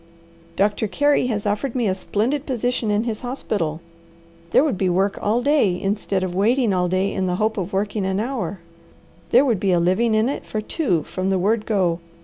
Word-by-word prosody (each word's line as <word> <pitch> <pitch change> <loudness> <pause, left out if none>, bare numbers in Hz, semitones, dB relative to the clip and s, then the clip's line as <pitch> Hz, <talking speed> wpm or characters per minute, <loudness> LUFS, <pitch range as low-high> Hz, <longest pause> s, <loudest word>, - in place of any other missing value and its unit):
"Doctor 210 +2 +1
Carey 290 +3 +2
has 215 -4 -2
offered 210 +5 -1
me 240 -4 +1
a 190 - +2
splendid 230 +9 -2
position 245 -3 -1
in 210 +1 +1
his 225 -3 -4
hospital. 205 - -3 0.7
There 265 - +4
would 295 -8 0
be 185 0 0
work 195 +3 +1
all 225 +4 +1
day, 250 -12 +2
instead 195 -1 -1
of 185 -1 -3
waiting 225 +3 +2
all 180 -1 +1
day 185 +2 0
in 190 -1 -1
the 180 - 0
hope 215 +3 0
of 190 -1 -3
working 205 +1 -1
an 190 +1 0
hour. 215 -7 -3 0.7
There 255 +4 +5
would 230 -8 +1
be 195 0 +1
a 175 - +3
living 200 +6 +2
in 215 +2 +3
it 280 - -3
for 215 - -4
two 210 - -1
from 185 +4 -3
the 190 - +2
word 210 +4 0
go. 185 -6 +1
205 Hz, 205 wpm, -22 LUFS, 185-235 Hz, 0.7 s, There